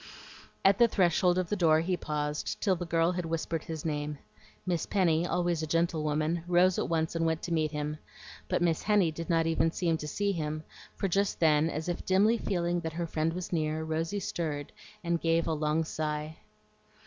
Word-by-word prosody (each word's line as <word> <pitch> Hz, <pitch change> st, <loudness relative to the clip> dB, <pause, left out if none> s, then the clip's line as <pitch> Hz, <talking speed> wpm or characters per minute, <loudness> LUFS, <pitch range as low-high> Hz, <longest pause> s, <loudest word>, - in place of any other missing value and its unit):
At 195 Hz, 0 st, +5 dB
the 235 Hz, -, +7 dB
threshold 180 Hz, -3 st, +2 dB
of 180 Hz, -2 st, -1 dB
the -, -, 0 dB
door 160 Hz, -4 st, +4 dB
he 180 Hz, +2 st, 0 dB
paused, 150 Hz, -2 st, -3 dB
till 195 Hz, -3 st, +2 dB
the 175 Hz, 0 st, -5 dB
girl 165 Hz, +1 st, +2 dB
had 180 Hz, 0 st, -2 dB
whispered 165 Hz, 0 st, -2 dB
his 160 Hz, -2 st, -6 dB
name. 150 Hz, -1 st, -2 dB, 0.5 s
Miss 175 Hz, -3 st, -1 dB
Penny, 175 Hz, -4 st, +2 dB
always 175 Hz, -2 st, 0 dB
a 155 Hz, -, -3 dB
gentlewoman, 160 Hz, 0 st, 0 dB
rose 180 Hz, +1 st, +4 dB
at -, -, -1 dB
once 160 Hz, 0 st, 0 dB
and 165 Hz, -, 0 dB
went 160 Hz, 0 st, 0 dB
to 170 Hz, -, -2 dB
meet 155 Hz, -2 st, +1 dB
him, 150 Hz, 0 st, -4 dB, 0.5 s
but -, -, +1 dB
Miss 165 Hz, -2 st, +1 dB
Henny 205 Hz, -6 st, +3 dB
did 165 Hz, +2 st, -7 dB
not 165 Hz, -1 st, +3 dB
even 165 Hz, 0 st, +2 dB
seem 165 Hz, -1 st, 0 dB
to 150 Hz, -, -6 dB
see 200 Hz, +6 st, 0 dB
him, 155 Hz, -3 st, -3 dB, 0.3 s
for 195 Hz, -, -1 dB
just 195 Hz, +2 st, 0 dB
then, 155 Hz, -1 st, +4 dB
as 155 Hz, +1 st, -4 dB
if 175 Hz, -, -3 dB
dimly 210 Hz, +5 st, +3 dB
feeling 175 Hz, -2 st, 0 dB
that 160 Hz, -2 st, -5 dB
her 170 Hz, +1 st, -2 dB
friend 160 Hz, 0 st, -1 dB
was 180 Hz, 0 st, -5 dB
near, 155 Hz, -1 st, 0 dB
Rosy 165 Hz, +5 st, -2 dB
stirred, 155 Hz, -6 st, -3 dB, 0.3 s
and 170 Hz, -1 st, 0 dB
gave 165 Hz, 0 st, +2 dB
a 165 Hz, -, 0 dB
long 155 Hz, +1 st, +1 dB
sigh. 155 Hz, 0 st, -4 dB
165 Hz, 200 wpm, -30 LUFS, 155-175 Hz, 0.5 s, the